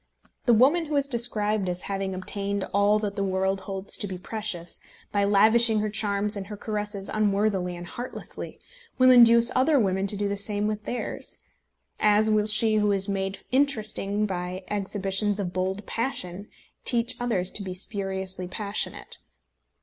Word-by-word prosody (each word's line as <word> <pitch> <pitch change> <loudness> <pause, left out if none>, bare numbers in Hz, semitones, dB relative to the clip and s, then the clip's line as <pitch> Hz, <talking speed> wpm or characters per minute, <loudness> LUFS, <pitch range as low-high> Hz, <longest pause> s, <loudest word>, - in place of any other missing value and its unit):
The 240 - +6
woman 290 +9 +4
who 300 -1 -3
is 280 -1 +2
described 215 -6 0
as 180 0 -3
having 195 -1 -3
obtained 200 +1 -3
all 200 +1 +4
that 205 -2 -3
the 200 - -1
world 190 0 0
holds 195 0 -3
to 205 - -3
be 185 -1 -6
precious, 190 -3 -4 0.3
by 200 -1 +1
lavishing 220 +2 +5
her 215 0 -2
charms 205 0 0
and 195 -2 -6
her 210 0 -7
caresses 210 -2 -3
unworthily 200 -3 0
and 175 - -8
heartlessly, 245 +8 -8 0.4
will 255 0 +6
induce 235 -1 +7
other 275 +3 +4
women 190 -2 0
to 205 - 0
do 205 0 -1
the 200 - -2
same 205 +1 -1
with 210 0 -3
theirs, 245 - -4 0.6
as 215 +1 +4
will 210 0 +3
she 215 0 +4
who 210 -1 +2
is 195 0 +3
made 195 -1 -3
interesting 215 -6 +1
by 180 -1 -4
exhibitions 200 0 -1
of 180 -3 -3
bold 190 +2 -2
passion 200 -6 -2 0.4
teach 235 -1 +3
others 195 -7 -1
to - - -5
be 185 -2 -5
spuriously 190 -2 -2
passionate. 205 +2 -3
205 Hz, 165 wpm, -26 LUFS, 195-215 Hz, 0.6 s, induce